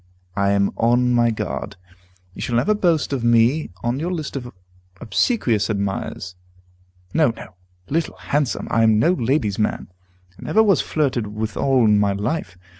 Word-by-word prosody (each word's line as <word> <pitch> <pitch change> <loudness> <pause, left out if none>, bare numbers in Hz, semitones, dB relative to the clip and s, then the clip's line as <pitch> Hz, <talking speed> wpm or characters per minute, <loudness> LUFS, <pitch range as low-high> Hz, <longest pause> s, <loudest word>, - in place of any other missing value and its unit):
I 100 0 +1
am 100 0 +2
on 125 +2 +2
my 120 -1 +3
guard. 110 - -4 0.6
You - - -9
shall 120 - -2
never 195 - +3
boast 170 -8 +1
of 130 -4 -2
me 120 +6 +3
on 120 +3 -1
your 170 +4 -2
list 155 -6 -4
of 125 -3 -5 0.5
obsequious 115 - 0
admirers. 100 -2 -3 0.8
No, 155 -4 +4
no, 95 - -11 0.3
Little 165 +2 -1
Handsome! 145 -3 -1
I 115 - +3
am 110 -1 +4
no 160 +11 +3
lady's 125 - 0
man, 105 - -1 0.5
and - - -10
never 220 - +4
was 200 -6 +3
flirted 130 -8 -1
withal 110 +4 0
in 105 -1 +4
my 100 -1 +2
life. 105 - -3
120 Hz, 160 wpm, -21 LUFS, 105-150 Hz, 0.8 s, No